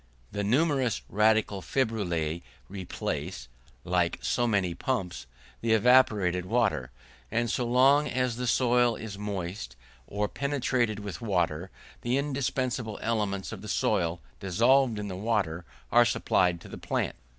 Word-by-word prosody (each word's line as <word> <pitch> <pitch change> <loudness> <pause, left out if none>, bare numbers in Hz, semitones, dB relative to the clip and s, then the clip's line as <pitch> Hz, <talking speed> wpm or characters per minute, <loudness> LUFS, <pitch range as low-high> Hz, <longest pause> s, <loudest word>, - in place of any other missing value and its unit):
The 100 - -2
numerous 130 +1 +1
radical 105 -1 +2
fibrillae 85 - -1 0.3
replace, 90 -6 -5 0.4
like 90 -1 +1
so 120 -1 0
many 100 -6 +1
pumps, 90 - -3 0.3
the 115 -1 +2
evaporated 105 -6 +4
water; 105 - +1 0.4
and 115 +1 0
so 120 - -1
long 135 +4 +5
as 125 -1 0
the 125 +1 -3
soil 120 -1 +3
is 105 -3 -7
moist, 95 - -4 0.3
or 105 +1 -1
penetrated 130 -4 0
with 100 -5 -6
water, 90 -5 0 0.3
the 120 +2 0
indispensable 130 -5 -2
elements 105 -4 -1
of 110 -4 -7
the 110 - -8
soil, 90 -6 0 0.2
dissolved 115 +6 +3
in 105 0 -4
the 95 - -5
water, 95 -5 -1 0.3
are - - +7
supplied 90 -2 +1
to - - -11
the - - -9
plant. - - -2
105 Hz, 135 wpm, -28 LUFS, 90-125 Hz, 0.4 s, are